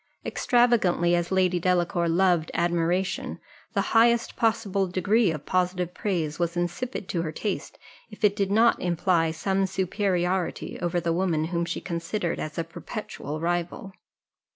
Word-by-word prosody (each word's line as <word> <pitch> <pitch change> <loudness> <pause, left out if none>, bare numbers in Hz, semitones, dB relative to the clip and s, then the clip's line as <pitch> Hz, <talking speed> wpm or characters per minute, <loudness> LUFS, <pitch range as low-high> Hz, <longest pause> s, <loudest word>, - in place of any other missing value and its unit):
Extravagantly 225 -8 +2
as 175 0 0
Lady 185 -1 +2
Delacour 175 -1 +1
loved 175 -2 +2
admiration, 175 +2 0 0.3
the - - +2
highest 235 +1 +4
possible 210 -4 +1
degree 200 +4 +2
of 155 -3 -4
positive 180 -1 0
praise 170 -7 -2
was 170 0 -1
insipid 180 +5 -3
to 170 - -1
her 160 -2 -3
taste, 205 +6 -4 0.3
if - - -13
it 205 -1 +4
did 200 -2 0
not 225 +3 +4
imply 175 -1 +1
some 190 +4 0
superiority 185 -1 -1
over 175 0 0
the 170 -1 0
woman 170 -3 +1
whom 170 0 0
she - - -3
considered 170 +1 -3
as 155 -1 -5
a 165 - 0
perpetual 165 -2 -6
rival. 175 +5 -2
180 Hz, 145 wpm, -26 LUFS, 170-195 Hz, 0.3 s, highest